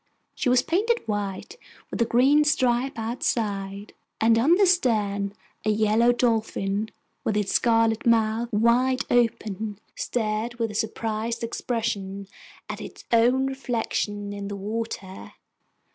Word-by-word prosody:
She -, -, -1 dB
was 250 Hz, 0 st, +4 dB
painted 440 Hz, -, 0 dB
white 205 Hz, -, -4 dB, 0.3 s
with -, -, -3 dB
a -, -, +4 dB
green 270 Hz, +6 st, +4 dB
stripe 260 Hz, -2 st, +1 dB
outside, 205 Hz, -3 st, -2 dB, 0.3 s
and 225 Hz, +1 st, +4 dB
on 300 Hz, +9 st, +5 dB
the 400 Hz, +2 st, +4 dB
stern 210 Hz, -, +1 dB, 0.3 s
a 215 Hz, -, 0 dB
yellow 215 Hz, +3 st, +3 dB
dolphin, 220 Hz, -3 st, 0 dB, 0.3 s
with 215 Hz, -2 st, 0 dB
its 205 Hz, -2 st, 0 dB
scarlet 225 Hz, -2 st, +3 dB
mouth 225 Hz, 0 st, +2 dB
wide 240 Hz, +4 st, +3 dB
open, 220 Hz, -3 st, 0 dB, 0.2 s
stared 220 Hz, 0 st, -2 dB
with 230 Hz, -2 st, -2 dB
a -, -, -9 dB
surprised 220 Hz, +2 st, -2 dB
expression 205 Hz, -5 st, -3 dB, 0.4 s
at -, -, -6 dB
its -, -, -10 dB
own 245 Hz, +3 st, +4 dB
reflection 225 Hz, -6 st, -2 dB
in 200 Hz, 0 st, -5 dB
the 200 Hz, -, -5 dB
water. 205 Hz, -2 st, -5 dB
225 Hz, 130 wpm, -25 LUFS, 210-245 Hz, 0.4 s, on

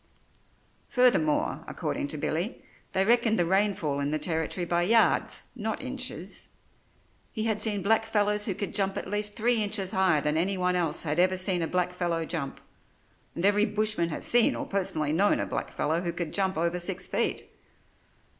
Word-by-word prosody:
Furthermore, 240 Hz, -, +2 dB
according -, -, -3 dB
to 155 Hz, -, -4 dB
Billy, 170 Hz, -, -3 dB, 0.3 s
they 190 Hz, 0 st, +1 dB
reckoned 230 Hz, 0 st, +3 dB
the 175 Hz, -, +2 dB
rainfall 190 Hz, -6 st, +1 dB
in 140 Hz, 0 st, -1 dB
the 155 Hz, -, 0 dB
Territory 160 Hz, +2 st, -2 dB
by 170 Hz, 0 st, 0 dB
yards, 225 Hz, +6 st, +2 dB
not 220 Hz, -2 st, -3 dB
inches. 255 Hz, -, -4 dB, 0.8 s
He 215 Hz, -, -3 dB
had 220 Hz, -2 st, -1 dB
seen 210 Hz, -3 st, 0 dB
blackfellows 210 Hz, -1 st, +1 dB
who 195 Hz, -, -2 dB
could 200 Hz, -, -3 dB
jump 195 Hz, -1 st, +1 dB
at -, -, -4 dB
least 205 Hz, +1 st, -1 dB
three 235 Hz, 0 st, +2 dB
inches 200 Hz, -2 st, 0 dB
higher 190 Hz, -5 st, +3 dB
than 150 Hz, +1 st, 0 dB
anyone 180 Hz, +1 st, 0 dB
else 170 Hz, -3 st, +1 dB
had 155 Hz, 0 st, -1 dB
ever 185 Hz, +1 st, +3 dB
seen 185 Hz, -1 st, +1 dB
a 165 Hz, -, -1 dB
blackfellow 175 Hz, -2 st, -1 dB
jump, 155 Hz, -5 st, -4 dB, 0.7 s
and 170 Hz, -, -1 dB
every 205 Hz, +2 st, +4 dB
bushman 210 Hz, -5 st, 0 dB
has 155 Hz, -, -1 dB
seen 240 Hz, -1 st, +4 dB
or -, -, -4 dB
personally 160 Hz, -6 st, -1 dB
known 200 Hz, +5 st, +2 dB
a -, -, -1 dB
blackfellow 160 Hz, +3 st, -2 dB
who 175 Hz, -1 st, -2 dB
could 170 Hz, -2 st, -4 dB
jump 190 Hz, -3 st, +1 dB
over 170 Hz, +2 st, 0 dB
six 180 Hz, +1 st, +1 dB
feet. -, -, -2 dB
185 Hz, 170 wpm, -27 LUFS, 170-210 Hz, 0.8 s, every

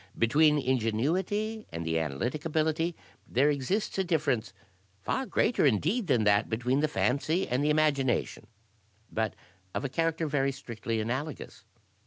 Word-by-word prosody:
Between 150 Hz, +6 st, +4 dB
ingenuity 155 Hz, -, 0 dB
and 85 Hz, 0 st, -5 dB
the 80 Hz, 0 st, +1 dB
analytic 80 Hz, -, -2 dB
ability 160 Hz, +1 st, 0 dB, 0.3 s
there 140 Hz, +4 st, +3 dB
exists 165 Hz, -, -1 dB
a -, -, +3 dB
difference 150 Hz, -, 0 dB, 0.5 s
far 265 Hz, -, -1 dB
greater, 225 Hz, -, +1 dB
indeed, 165 Hz, -, +2 dB
than 120 Hz, -7 st, +3 dB
that 105 Hz, 0 st, +3 dB
between 125 Hz, +4 st, 0 dB
the 155 Hz, -, +2 dB
fancy 155 Hz, +5 st, 0 dB
and 125 Hz, +3 st, 0 dB
the 150 Hz, -, +2 dB
imagination, 150 Hz, -4 st, +1 dB, 0.6 s
but 110 Hz, -1 st, -1 dB, 0.4 s
of -, -, -2 dB
a -, -, -1 dB
character 165 Hz, +2 st, 0 dB
very 140 Hz, -2 st, +1 dB
strictly 115 Hz, -4 st, -4 dB
analogous. 130 Hz, +7 st, -4 dB
140 Hz, 140 wpm, -29 LUFS, 115-160 Hz, 0.6 s, Between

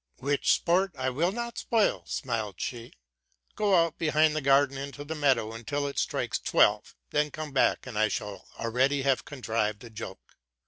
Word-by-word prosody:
'? -, -, -58 dB
—'* -, -, -35 dB
Which 140 Hz, +1 st, +1 dB
sport 180 Hz, +2 st, +2 dB
I 130 Hz, 0 st, -1 dB
will 165 Hz, +8 st, +1 dB
not 235 Hz, +2 st, -4 dB
spoil," 225 Hz, -3 st, +1 dB
smiled 115 Hz, -, -3 dB
she: 120 Hz, -1 st, -5 dB, 0.3 s
'* -, -, -41 dB
go 205 Hz, -2 st, +3 dB
out 165 Hz, -1 st, +2 dB
behind 155 Hz, -1 st, +3 dB
the 155 Hz, -, 0 dB
garden 135 Hz, 0 st, +4 dB
into 140 Hz, +1 st, -6 dB
the 150 Hz, +2 st, -5 dB
meadow 130 Hz, -7 st, +1 dB
until 145 Hz, +6 st, -3 dB
it 140 Hz, -, -3 dB
strikes -, -, -1 dB
twelve, -, -, +2 dB, 0.2 s
then 150 Hz, 0 st, +1 dB
come 155 Hz, 0 st, -6 dB
back; 135 Hz, -, +2 dB
and 120 Hz, -5 st, -4 dB
I 110 Hz, -, +4 dB
shall 105 Hz, -1 st, -5 dB
already 130 Hz, +4 st, +1 dB
have 135 Hz, -1 st, +1 dB
contrived 110 Hz, -6 st, -2 dB
the 120 Hz, -, -11 dB
joke. 110 Hz, -3 st, -9 dB
140 Hz, 190 wpm, -28 LUFS, 115-155 Hz, 0.3 s, garden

